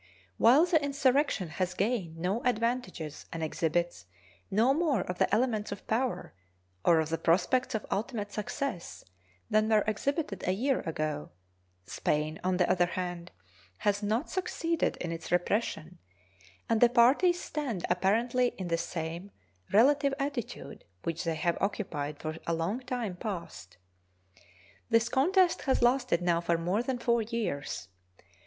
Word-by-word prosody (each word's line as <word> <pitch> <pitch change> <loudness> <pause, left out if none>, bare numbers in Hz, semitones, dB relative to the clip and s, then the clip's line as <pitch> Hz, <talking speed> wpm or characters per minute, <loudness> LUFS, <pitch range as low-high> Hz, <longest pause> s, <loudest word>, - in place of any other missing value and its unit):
While 270 +8 +7
the 320 -4 +2
insurrection 275 - +1
has 185 +2 -2
gained 195 -6 -1
no 185 +8 -1
advantages 235 - -2
and 165 -1 -4
exhibits 160 - -1 0.4
no 230 +7 +3
more 295 - +1
of 180 0 -5
the - - +2
elements 220 -2 +1
of 200 - -7
power 245 +3 -1 0.5
or 165 -2 +5
of 160 0 -1
the 165 - -1
prospects 200 +9 +2
of 220 - -3
ultimate 210 0 -2
success 210 - -4 0.4
than 215 0 +2
were 215 -2 +4
exhibited 215 - -2
a 185 - +3
year 255 +7 +1
ago, 155 -2 -3 0.6
Spain, 155 +1 -1
on 185 0 +1
the 180 - +3
other 175 -1 +3
hand, 175 -1 -4 0.5
has 205 - 0
not 220 +7 -1
succeeded 335 -3 -1
in 170 - -4
its 165 0 -6
repression, 175 -2 -1 0.7
and 225 -1 +1
the 240 - +7
parties 270 +9 +4
stand 265 - -3
apparently 235 +7 +1
in 185 -2 -4
the 165 0 +1
same 170 +4 -4 0.4
relative 275 +5 +4
attitude 275 -4 -5 0.2
which 165 0 -3
they 165 -1 0
have 170 +2 0
occupied 150 -8 -2
for 155 0 -4
a 165 - +1
long 170 +9 -1
time 245 -6 -3
past. 170 - -6 1.1
This 230 0 +3
contest 355 +6 +3
has 265 - +3
lasted 245 -8 +2
now 170 -1 +2
for 170 0 +1
more 180 +6 0
than 250 +1 -2
four 235 -1 +2
years. 210 - -3
210 Hz, 145 wpm, -30 LUFS, 170-250 Hz, 1.1 s, While